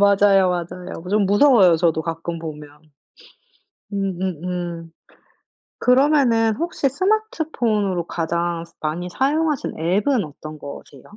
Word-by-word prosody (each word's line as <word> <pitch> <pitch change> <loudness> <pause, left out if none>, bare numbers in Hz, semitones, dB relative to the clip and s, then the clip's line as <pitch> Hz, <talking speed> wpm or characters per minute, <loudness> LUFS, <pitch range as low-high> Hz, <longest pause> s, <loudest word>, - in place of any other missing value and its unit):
맞아요, 200 -2 +5
맞아요. 180 0 -5
좀 210 0 +3
무서워요 205 - +5
저도 160 -1 +1
가끔 165 +1 -4
보면. 150 -2 -8 1.2
음음음. 180 -3 -3 0.9
그러면은 250 -4 +3
혹시 325 -2 -1
스마트폰으로 270 - 0
가장 170 0 -2 0.2
많이 165 +4 -3
사용하시는 295 - -1
앱은 205 - +1
어떤 155 +1 -10
거세요? 140 -1 -10
185 Hz, 260 characters per minute, -21 LUFS, 165-240 Hz, 1.2 s, 맞아요